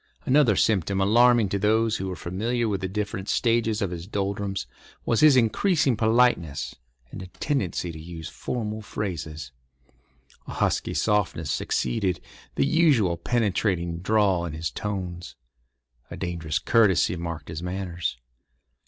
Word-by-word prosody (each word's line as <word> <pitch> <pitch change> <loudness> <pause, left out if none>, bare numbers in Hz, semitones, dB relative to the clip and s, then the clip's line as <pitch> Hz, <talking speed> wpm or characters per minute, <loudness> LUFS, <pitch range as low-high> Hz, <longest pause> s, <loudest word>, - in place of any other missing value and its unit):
Another 130 -6 +4
symptom 100 -1 +1
alarming 115 +3 +5
to 100 - -1
those 110 +2 +2
who 95 - -4
were 95 - -4
familiar 115 +8 -2
with 100 -3 -2
the 95 - -1
different 100 0 -4
stages 115 -2 +1
of 95 - -2
his 85 0 -6
doldrums 100 -1 -2 0.4
was 115 - +2
his 150 -3 +7
increasing 135 - +2
politeness 110 - +2 0.4
and - - -7
a 95 - -8
tendency 90 - -2
to 80 - -9
use 80 0 -8
formal 110 +1 -4
phrases. 80 -10 -5 1.0
A - - -6
husky - - 0
softness 95 -8 0
succeeded 90 - -1 0.4
the - - +2
usual 140 - +3
penetrating 90 -4 0
drawl 95 -2 +2
in 85 -3 -4
his 80 -1 -3
tones. 90 -4 -5 0.7
A - - -7
dangerous 85 -4 -2
courtesy 95 -1 +3
marked 85 -3 -6
his 80 0 -5
manners. 90 -5 -3
95 Hz, 135 wpm, -25 LUFS, 85-110 Hz, 1.0 s, his